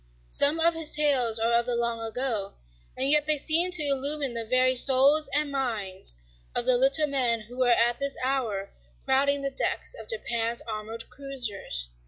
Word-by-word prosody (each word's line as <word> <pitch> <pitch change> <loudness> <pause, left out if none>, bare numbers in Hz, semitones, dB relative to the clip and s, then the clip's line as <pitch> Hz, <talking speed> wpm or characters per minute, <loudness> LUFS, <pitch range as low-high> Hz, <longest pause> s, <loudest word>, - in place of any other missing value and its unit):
Some 285 - +3
of 335 +1 +3
his 325 -2 +3
tales 265 -7 +2
are 230 +1 0
of 235 +1 +1
the 245 - -1
long 235 -1 -2
ago, 225 -3 -4 0.4
and 270 +2 +2
yet 300 0 +4
they 305 -1 +2
seem 330 +5 +2
to 355 -4 +2
illumine 280 -1 0
the 230 -1 -4
very 255 +2 +2
souls 275 +3 +3
and 295 0 -1
minds 205 - 0 0.4
of 240 - -1
the 255 0 +3
little 270 +5 +3
men 250 -5 0
who 245 +4 -4
are - - +2
at 240 0 +2
this 280 0 -3
hour 225 -8 -3 0.3
crowding 275 +1 +1
the 275 - -2
decks - - -2
of - - -11
Japan's 235 - -2
armored 220 +1 -7
cruisers. 220 - -3
255 Hz, 180 wpm, -26 LUFS, 230-280 Hz, 0.4 s, yet